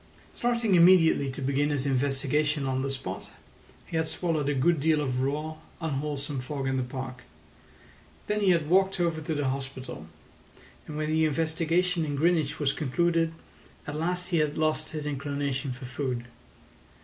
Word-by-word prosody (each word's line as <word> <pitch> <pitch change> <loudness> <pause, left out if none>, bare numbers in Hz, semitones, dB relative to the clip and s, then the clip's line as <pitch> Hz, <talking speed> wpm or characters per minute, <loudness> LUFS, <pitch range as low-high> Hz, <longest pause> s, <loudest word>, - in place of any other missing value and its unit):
Starting 235 -4 +1
immediately 170 -5 +6
to 135 +1 -5
begin 140 +2 +1
his 145 -2 -1
investigation 140 +2 +1
on 130 0 0
the 135 - -1
spot, 135 -1 -5 0.6
he - - -7
had 160 0 +1
swallowed 155 -5 0
a - - +2
good 165 +4 +3
deal 155 +1 +3
of 130 -4 -1
raw, 150 +4 -2 0.2
unwholesome 145 -3 -3
fog 135 +1 -3
in 135 - 0
the 130 - +1
park. 130 0 -5 1.0
Then 210 0 0
he 200 -2 +3
had 165 -4 +3
walked 190 +2 +3
over 165 -2 +1
to 155 0 -2
the 145 -2 0
hospital; 130 - -5 0.8
and 150 - -6
when 155 0 -1
the 160 0 +3
investigation 165 +3 +1
in 145 -2 -2
Greenwich 160 -1 +2
was 140 -2 +1
concluded 165 +3 +1 0.5
at 145 - -5
last 180 +3 -1
he 175 - +2
had 150 -1 +1
lost 155 0 0
his 155 -2 -5
inclination 140 -1 -2
for 125 +1 -7
food. 130 -2 -3
150 Hz, 165 wpm, -28 LUFS, 135-165 Hz, 1.0 s, immediately